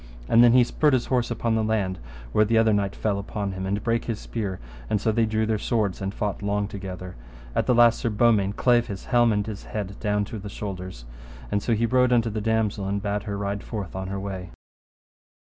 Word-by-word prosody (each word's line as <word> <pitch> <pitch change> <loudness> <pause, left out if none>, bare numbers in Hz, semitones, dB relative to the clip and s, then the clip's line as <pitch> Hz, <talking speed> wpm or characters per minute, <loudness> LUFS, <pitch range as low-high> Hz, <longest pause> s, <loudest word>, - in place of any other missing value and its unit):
And 115 - +6
then 120 -1 +7
he 125 0 +7
spurred 150 +4 +2
his 125 -2 +2
horse 125 -2 0
upon 115 -1 -1
the 110 0 +1
land, 105 -4 0 0.3
where 105 - +4
the 115 +2 +2
other 110 -1 +4
knight 100 -1 0
fell 100 -2 -1
upon 100 0 -4
him, 95 0 -4
and 100 +1 -1
brake 115 0 0
his 115 -3 -2
spear, 100 -5 -4 0.3
and 105 - +1
so 110 - +1
they 115 0 +2
drew 110 0 0
their 110 -1 0
swords 105 -5 -1
and 95 0 -2
fought 100 -1 -3
long 100 0 0
together. 95 -2 -7 0.4
At - - 0
the 125 - +4
last 120 -1 +5
Sir 115 - 0
Beaumains 105 -3 +2
clave 120 -1 +3
his 100 -2 -6
helm 120 -2 +4
and 105 -1 0
his 105 -2 -7
head 100 -2 -5
down 105 -1 0
to 110 - -7
the 100 +1 -7
shoulders; 95 - -6 0.5
and 105 0 +1
so 115 - +1
he 115 +2 +1
rode 125 +1 +3
unto 115 -2 +3
the 110 +1 -3
damosel 110 -2 0
and 100 +1 -1
bade 100 0 -2
her 100 -2 -3
ride 100 0 -2
forth 100 -6 -6
on 95 0 -4
her 100 +1 -3
way. 95 -2 -5
105 Hz, 230 wpm, -25 LUFS, 100-115 Hz, 0.5 s, then